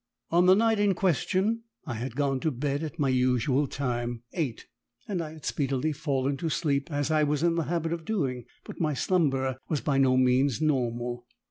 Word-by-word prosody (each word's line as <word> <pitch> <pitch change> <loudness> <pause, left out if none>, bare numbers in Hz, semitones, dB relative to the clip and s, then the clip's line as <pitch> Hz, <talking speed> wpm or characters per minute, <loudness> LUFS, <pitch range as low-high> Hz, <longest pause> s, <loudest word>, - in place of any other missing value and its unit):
On 175 +2 +4
the 185 - +8
night 225 0 +3
in 205 -2 +3
question, 190 +5 +1 0.2
I 130 - -4
had 120 +2 -5
gone 140 -2 0
to 160 - 0
bed 140 +1 -2
at 160 +1 -5
my 140 -4 +1
usual 130 +2 +2
time 120 -3 -3
eight 140 -10 -3 0.4
and 190 -4 -1
I 155 -1 -6
had 155 - -12
speedily 140 +1 0
fallen 140 -2 -1
to 165 +3 -2
sleep, 145 -1 0
as 145 +1 -1
I 155 -1 +3
was 150 0 +1
in 170 -1 +3
the 165 -2 -1
habit 165 -1 -1
of 170 -1 -5
doing; 135 - -2 0.2
but - - -10
my 155 -3 +1
slumber 135 -7 +1
was 155 - 0
by 140 -2 +1
no 130 -1 +4
means 130 0 +3
normal. 120 -5 -1
145 Hz, 200 wpm, -28 LUFS, 130-165 Hz, 0.4 s, the